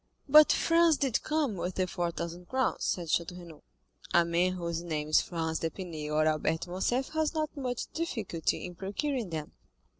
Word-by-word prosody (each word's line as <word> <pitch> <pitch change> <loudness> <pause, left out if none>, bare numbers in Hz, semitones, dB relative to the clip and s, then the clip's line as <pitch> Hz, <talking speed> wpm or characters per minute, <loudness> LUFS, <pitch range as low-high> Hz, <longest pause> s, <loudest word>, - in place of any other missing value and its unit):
"But 300 +2 +8
Franz 330 -2 +4
did 270 -5 +1
come 300 -9 0
with 180 +1 -3
the 185 - +1
four 175 -1 -2
thousand 170 +1 -6
crowns," 260 0 0
said 170 -3 -1
Château 175 +2 0
Renaud. 170 -4 -12 0.5
"A 170 -1 +6
man 175 +2 +1
whose 170 -2 -3
name 155 -3 -3
is 155 - +5
Franz 160 -2 -2
d'Épinay 165 -3 -4
or 155 0 +3
Albert 155 +1 +1
de 175 - -6
Morcerf 240 +8 0
has 315 +1 -1
not 310 0 -2
much 250 -4 -3
difficulty 220 - -2
in 180 - -7
procuring 210 - -3
them." 155 -2 -5
180 Hz, 180 wpm, -30 LUFS, 165-260 Hz, 0.5 s, But